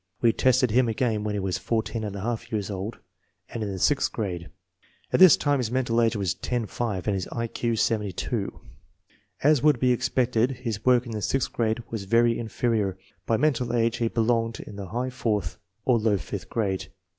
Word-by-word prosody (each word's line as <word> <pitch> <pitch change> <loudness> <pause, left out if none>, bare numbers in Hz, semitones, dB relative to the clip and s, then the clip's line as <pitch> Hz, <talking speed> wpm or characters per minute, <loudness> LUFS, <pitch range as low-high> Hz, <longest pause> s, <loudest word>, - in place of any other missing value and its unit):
We 115 -2 +4
tested 130 -2 +3
him 120 +1 +3
again 110 -3 0
when 105 -1 -2
he - - -1
was 95 -1 -2
14 115 0 -2
J 105 +3 -2
years 105 -3 -2
old 100 +4 -4 0.5
and 115 - -5
in 105 -2 -2
the 95 - -4
sixth 140 +9 +2
grade. 90 -6 -4 0.6
At - - +3
this 185 -4 +9
time 145 -1 +1
his 120 -4 -1
mental 120 -2 +1
age 115 0 +2
was 95 -4 0
10 115 +5 -2
5 105 -4 -3
and 105 - +2
his 95 -2 -2
I 115 -1 -3
Q 115 0 -2
72. 105 -4 -1 0.8
As 150 -2 +5
would 150 -4 +4
be 125 0 +3
expected, 125 -1 +1
his 110 -4 -3
work 125 -1 +4
in 120 - -7
the 110 -1 -3
sixth 135 +5 -1
grade 115 0 0
was 110 -4 -4
very 115 +3 +3
inferior. 110 -4 -1 0.3
By 115 - +2
mental 125 -5 +1
age 115 0 +1
he 115 - +1
belonged 115 0 0
in 105 - -9
the 100 -1 -6
high 125 +6 -3
fourth 105 -8 -2 0.3
or 125 -3 +4
low 105 -2 +2
fifth 90 - -6
grade. 100 -4 -1
115 Hz, 195 wpm, -26 LUFS, 105-120 Hz, 0.8 s, this